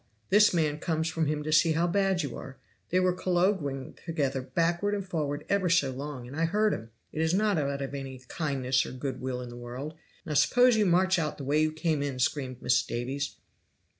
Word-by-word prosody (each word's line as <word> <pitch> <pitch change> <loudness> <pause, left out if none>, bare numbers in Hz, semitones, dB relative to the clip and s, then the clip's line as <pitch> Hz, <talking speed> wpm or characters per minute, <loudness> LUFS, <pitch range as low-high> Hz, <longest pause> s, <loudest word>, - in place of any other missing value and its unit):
this 210 +1 +6
man 155 -3 0
comes 160 0 -1
from 160 -1 0
him 150 0 -1
to 155 - -3
see 160 +1 +5
how 165 +2 +2
bad 190 0 +1
you 140 - -4
are 135 0 -9 0.3
they 180 - +3
were 185 -1 +3
colloguing 175 -7 0
together 140 -6 -1
backward 170 +8 0
and 195 -2 -4
forward 150 -4 -2
ever 200 -3 +1
so 145 -5 +3
long, 135 -1 -6
and 135 - -9
I 165 +1 +1
heard 210 +5 +2
'em 115 - -6 0.2
it 155 - -3
is 160 +2 +2
not 205 -3 +2
out 140 -1 -1
of 135 - -5
any 135 -2 -6
kindness 135 -5 0
or - - -7
good 130 +1 -4
will 125 -1 -3
in 125 - -7
the 120 - -9
world. 125 +5 -6 0.3
Now 155 - -3
suppose 245 - +5
you 210 -2 +3
march 185 +1 +3
out 150 -2 -2
the 140 - -7
way 145 +3 +2
you 155 0 +2
came 155 -1 -1
in!" 140 -2 -2
screamed 130 -1 -1
Mrs. 125 0 +2
Davies. 135 +4 -3
155 Hz, 220 wpm, -28 LUFS, 135-175 Hz, 0.3 s, this